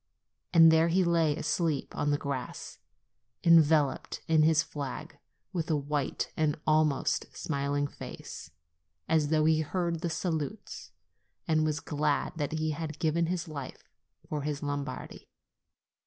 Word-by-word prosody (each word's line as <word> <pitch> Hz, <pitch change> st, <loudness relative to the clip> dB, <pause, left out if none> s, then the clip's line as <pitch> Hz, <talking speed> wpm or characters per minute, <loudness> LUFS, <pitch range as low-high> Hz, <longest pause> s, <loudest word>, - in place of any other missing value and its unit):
And 165 Hz, -1 st, +8 dB
there 160 Hz, +1 st, +4 dB
he 185 Hz, +3 st, +3 dB
lay 165 Hz, -3 st, +2 dB
asleep 160 Hz, -1 st, -1 dB
on 145 Hz, -, 0 dB
the 145 Hz, -, +2 dB
grass, 140 Hz, -3 st, -5 dB, 0.6 s
enveloped 160 Hz, -4 st, +4 dB
in 160 Hz, -1 st, +4 dB
his 155 Hz, 0 st, +4 dB
flag, 140 Hz, -4 st, -6 dB, 0.3 s
with 170 Hz, -3 st, -2 dB
a 160 Hz, -, +3 dB
white 145 Hz, -1 st, -2 dB
and 155 Hz, -1 st, 0 dB
almost 155 Hz, -3 st, +2 dB
smiling 145 Hz, -1 st, -1 dB
face, 140 Hz, -, -8 dB, 0.6 s
as 155 Hz, -2 st, +2 dB
though 155 Hz, 0 st, +2 dB
he 160 Hz, 0 st, +4 dB
heard 170 Hz, +1 st, -1 dB
the 170 Hz, -, -2 dB
salutes 160 Hz, +3 st, -4 dB, 0.6 s
and 155 Hz, -1 st, +2 dB
was 150 Hz, -1 st, 0 dB
glad 150 Hz, -2 st, -1 dB
that 150 Hz, -1 st, -2 dB
he 155 Hz, 0 st, 0 dB
had 155 Hz, 0 st, -5 dB
given 165 Hz, +1 st, +1 dB
his 175 Hz, -1 st, -2 dB
life 140 Hz, -4 st, -7 dB, 0.4 s
for 150 Hz, -1 st, -3 dB
his 145 Hz, 0 st, -3 dB
Lombardy. 145 Hz, -2 st, -5 dB
155 Hz, 140 wpm, -29 LUFS, 145-160 Hz, 0.6 s, And